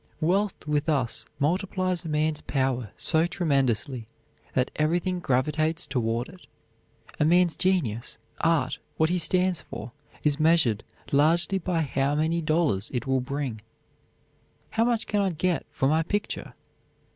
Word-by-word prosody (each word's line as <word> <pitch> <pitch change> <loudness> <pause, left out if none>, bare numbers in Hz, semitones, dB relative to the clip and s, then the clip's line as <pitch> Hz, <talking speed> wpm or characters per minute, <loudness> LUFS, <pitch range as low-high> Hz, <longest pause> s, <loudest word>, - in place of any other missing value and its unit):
Wealth 190 +3 0
with 150 +1 0
us 135 -6 0
multiplies 185 +3 0
a - - -4
man's 150 0 +1
power 130 -5 -1
so 160 +2 +2
tremendously 135 - 0 0.5
that 130 -1 +1
everything 175 +4 +1
gravitates 155 +4 +1
toward 120 -2 -1
it. 180 +1 -15 0.7
A - - +4
man's 175 +2 +4
genius, 145 - 0 0.2
art, 160 -6 +1 0.2
what 160 +1 +2
he 180 - +1
stands 180 +2 +2
for, 115 +3 -8 0.3
is 150 -1 +2
measured 155 -10 +3 0.3
largely 165 +6 +3
by 175 -2 0
how 140 0 0
many 160 +3 +1
dollars 155 - +1
it 120 - -1
will 135 -1 +1
bring. 135 -4 -4 1.1
"How 225 +1 +2
much 235 -2 +1
can 205 -1 0
I 195 - +2
get 175 -1 -1
for 135 - 0
my 155 +3 +3
picture?" 205 +6 -3
155 Hz, 140 wpm, -26 LUFS, 135-175 Hz, 1.1 s, A